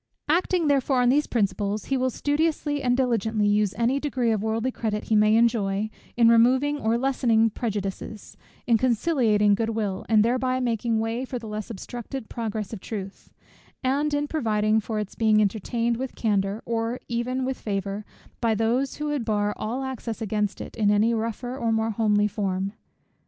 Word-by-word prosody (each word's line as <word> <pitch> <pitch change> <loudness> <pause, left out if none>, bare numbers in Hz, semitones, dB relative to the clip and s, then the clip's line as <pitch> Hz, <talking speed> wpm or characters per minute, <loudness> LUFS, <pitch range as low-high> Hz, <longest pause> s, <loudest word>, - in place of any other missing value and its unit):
Acting 340 +1 +2
therefore 275 -2 +2
on 245 - +4
these 290 +4 +3
principles, 205 -1 -1
he 270 - 0
will 260 0 +1
studiously 290 +1 0
and 245 -1 +2
diligently 225 -4 +1
use 205 -1 +2
any 240 +4 +2
degree 260 -5 0
of 215 -2 0
worldly 225 +3 -1
credit 215 -3 -2
he 220 - +3
may 215 +1 +5
enjoy, 215 -3 +1 0.3
in 235 -1 +6
removing 255 +6 +4
or 225 -2 +1
lessening 235 -4 +2
prejudices; 205 -1 -5 0.3
in 230 -2 +3
conciliating 230 -5 +3
good 225 +2 0
will, 210 -4 -2
and 215 -1 +5
thereby 255 +2 +1
making 235 -2 0
way 225 +3 -1
for 260 -1 -4
the 230 -2 -8
less 215 +1 -5
obstructed 240 +3 -7
progress 220 -2 -4
of 205 - -6
truth; 200 -3 -7 0.5
and 290 +3 +1
in 290 0 0
providing 215 -7 +1
for 220 0 -4
its 210 -2 -3
being 215 -2 +3
entertained 230 +3 0
with 265 +1 -5
candour, 205 -1 0
or 230 +1 -2
even 250 +2 -1
with 265 0 -3
favour, 200 0 -3 0.4
by 230 -2 +2
those 235 +5 0
who 300 - -4
would 290 -4 -1
bar 210 -2 0
all 240 +5 -3
access 250 -4 -5
against 210 -2 -1
it - - -8
in 210 -2 +3
any 210 +3 +3
rougher 230 +2 -3
or 235 -4 -1
more 220 0 +1
homely 210 -1 +2
form. 195 -1 -2
225 Hz, 175 wpm, -25 LUFS, 210-255 Hz, 0.5 s, in